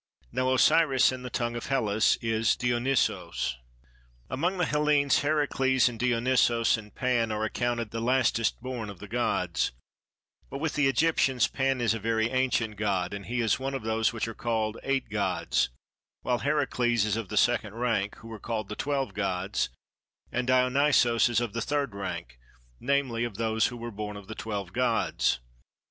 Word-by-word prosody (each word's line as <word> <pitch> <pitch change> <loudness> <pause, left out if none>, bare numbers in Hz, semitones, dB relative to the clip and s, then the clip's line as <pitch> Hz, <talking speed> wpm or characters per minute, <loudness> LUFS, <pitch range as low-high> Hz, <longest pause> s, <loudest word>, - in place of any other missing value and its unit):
Now 130 0 0
Osiris 135 0 +4
in 130 -1 -6
the 125 - -6
tongue 120 0 -2
of 120 - -5
Hellas 110 -6 +2
is 115 0 +2
Dionysos. 120 - 0 0.7
Among 175 +9 0
the 175 - +2
Hellenes 150 -2 +2
Heracles 135 -4 +2
and 120 -2 -4
Dionysos 120 -1 +3
and 105 -2 -10
Pan 120 -4 +1
are 105 0 -2
accounted 120 -1 -2
the 115 - -4
lastest 120 -2 +1
born 125 -4 -4
of 100 - -9
the 105 - -10
gods; 90 - 0 0.8
but 135 - -5
with 155 +2 -2
the 145 -1 +2
Egyptians 135 -4 +2
Pan 135 -1 0
is 115 -3 +2
a 115 - -3
very 110 +1 0
ancient 125 -4 0
god, 100 -4 -1
and 100 -1 -7
he 120 +1 -1
is 115 +2 +1
one 135 +1 -3
of 135 - -4
those 110 0 +1
which 115 -1 -3
are 115 - -5
called 110 -1 -2
eight 135 0 -1
gods, 60 0 0 0.5
while 125 -1 0
Heracles 120 -6 +1
is 105 -1 0
of 115 -4 -4
the 105 - -3
second 115 -4 +2
rank, 110 -4 -1
who 115 +1 -12
are 110 - -8
called 110 -1 -4
the 105 - -4
twelve 140 0 -2
gods, 95 -1 -1 0.6
and 125 -1 -2
Dionysos 125 -2 +3
is 120 - +2
of 120 -4 -3
the 115 - -2
third 140 -4 -1
rank, 65 -11 -6 0.4
namely 130 -3 0
of 120 -4 -4
those 110 -1 +1
who 120 - -7
were 120 0 -6
born 105 0 -5
of 100 -2 -11
the 110 - -6
twelve 100 -5 -5
gods. 120 - +1
120 Hz, 175 wpm, -28 LUFS, 110-130 Hz, 0.8 s, Osiris